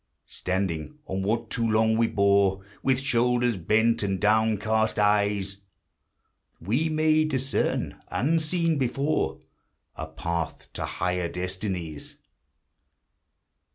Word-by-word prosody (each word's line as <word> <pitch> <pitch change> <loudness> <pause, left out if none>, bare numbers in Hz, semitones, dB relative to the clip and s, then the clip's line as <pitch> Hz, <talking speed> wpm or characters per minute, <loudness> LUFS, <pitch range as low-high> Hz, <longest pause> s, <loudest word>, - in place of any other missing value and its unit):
Standing 95 - -3
on 95 +1 -3
what 110 +3 -1
too 115 -2 0
long 110 +1 +3
we 115 0 +3
bore 100 -2 +2 0.2
With 130 -1 +2
shoulders 125 -2 +2
bent 110 +6 +2
and 95 -2 -1
downcast 110 +1 +2
eyes, 100 -1 +1 1.0
We 120 - 0
may 155 0 +3
discern 135 -3 -1
— - - -38
unseen 165 - +1
before 135 +4 0 0.3
— - - -50
A 80 - -5
path 85 0 -4
to - - -3
higher 90 -1 -2
destinies. 90 -4 -4
110 Hz, 110 wpm, -26 LUFS, 95-125 Hz, 1.0 s, long